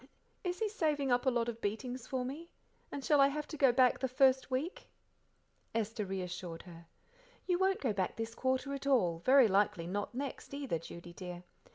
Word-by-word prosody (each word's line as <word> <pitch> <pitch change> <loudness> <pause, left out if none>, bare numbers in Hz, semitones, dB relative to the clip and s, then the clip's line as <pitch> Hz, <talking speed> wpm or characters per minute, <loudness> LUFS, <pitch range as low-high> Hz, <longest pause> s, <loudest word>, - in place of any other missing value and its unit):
"Is 360 -1 -2
he 440 - 0
saving 300 - 0
up 245 +2 +2
a - - +8
lot 240 -2 0
of 230 -1 -5
beatings 245 +4 -3
for 255 -1 -2
me? 310 +7 -6 0.4
And 280 -2 -5
shall 295 -2 +5
I 275 - +7
have 300 +2 -3
to - - -5
go 270 -3 +5
back 250 0 +4
the 260 - 0
first 260 +1 +3
week?" 270 +8 -3 0.9
Esther 220 -1 -1
reassured 180 -3 -5
her. 170 -2 -13 0.6
"You 360 -1 +1
won't 380 0 +2
go 245 -6 +1
back 190 -2 -1
this 225 0 -4
quarter 260 +2 -1
at 275 0 -5
all, 185 -12 +3
very 260 +5 +6
likely 195 -4 +2
not 205 +6 -3
next 275 +1 -5
either, 275 - -2
Judy 170 +1 -10
dear. 180 -1 -7
255 Hz, 195 wpm, -33 LUFS, 200-280 Hz, 0.9 s, a